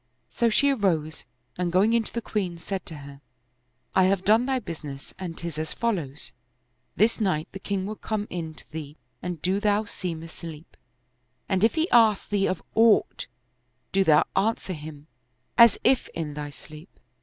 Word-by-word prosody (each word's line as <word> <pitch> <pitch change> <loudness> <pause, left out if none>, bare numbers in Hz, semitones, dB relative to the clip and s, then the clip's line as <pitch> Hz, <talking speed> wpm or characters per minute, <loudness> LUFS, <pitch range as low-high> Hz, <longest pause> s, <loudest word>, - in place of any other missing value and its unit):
So 235 - +1
she 280 +6 +3
arose 165 - 0 0.3
and 175 -1 0
going 195 +6 +4
in 235 -1 +3
to - - -10
the 235 - -4
queen, 185 -5 -2
said 190 +2 -5
to 160 - -6
her, 140 0 -12 0.4
" - - -44 0.3
I 190 - +6
have 190 0 +1
done 220 +5 +4
thy 265 -1 +1
business 150 - -7
and 175 -3 -5
'tis 170 -3 -5
as 155 - -2
follows: 170 - -2 0.6
This 225 +4 +3
night 165 -7 0
the 195 - -8
king 195 -1 -2
will 215 +1 -5
come 215 -1 -3
in 160 -3 -4
to - - -16
thee 150 -1 -7 0.2
and 180 -2 -4
do 190 +2 +1
thou 210 0 +2
seem 170 -5 -5
asleep; 165 -1 -10 0.7
and 190 0 +1
if 225 - +4
he 320 +1 +2
ask 225 -4 +5
thee 200 -1 +2
of 185 - -2
aught, 225 -1 +3 0.6
do 195 0 +3
thou 155 -4 +5
answer 200 -1 0
him, 150 -2 -9 0.5
as 235 -1 +7
if 260 -1 +3
in 155 -3 -3
thy 145 0 -5
sleep." 155 +4 -13
185 Hz, 180 wpm, -26 LUFS, 160-215 Hz, 0.7 s, as